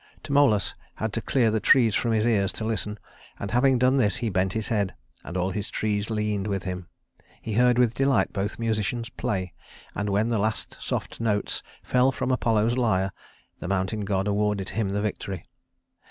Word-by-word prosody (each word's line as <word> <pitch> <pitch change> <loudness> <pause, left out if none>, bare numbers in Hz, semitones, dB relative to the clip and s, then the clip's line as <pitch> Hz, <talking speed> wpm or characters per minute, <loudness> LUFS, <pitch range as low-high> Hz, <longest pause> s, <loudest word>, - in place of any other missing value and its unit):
Tmolus 140 - +3 0.2
had 110 -1 -3
to 115 - -1
clear 120 -3 +2
the 110 - +1
trees 115 +1 +5
from 115 +4 +1
his 110 0 +2
ears 100 -5 +2
to 110 - -4
listen; 105 -1 -2 0.4
and 100 - -4
having 130 +2 +4
done 130 +2 +3
this 105 -7 +2
he 115 0 -1
bent 95 0 +1
his 110 +1 -2
head, 100 -5 0 0.3
and 90 - -5
all 90 +1 0
his 100 +2 -4
trees 105 0 -1
leaned 105 -2 -1
with 100 -2 -2
him. 90 -2 -5 0.5
He 110 - -5
heard 125 +2 +4
with 120 -2 +4
delight 135 +2 +2
both 100 0 -2
musicians 115 +1 -1
play; 95 -4 -3 0.4
and 100 0 -2
when 105 +3 +1
the 115 -3 +1
last 110 +1 -2
soft - - -3
notes 105 -3 0 0.2
fell 125 +1 +3
from 130 - -2
Apollo's 115 -1 +2
lyre, 95 -5 +2 0.5
the - - -5
mountain 100 +2 -1
god 100 -1 0
awarded 105 -1 0
him 110 -3 -1
the 100 +1 -1
victory. 100 -4 -4
105 Hz, 185 wpm, -26 LUFS, 100-115 Hz, 0.5 s, trees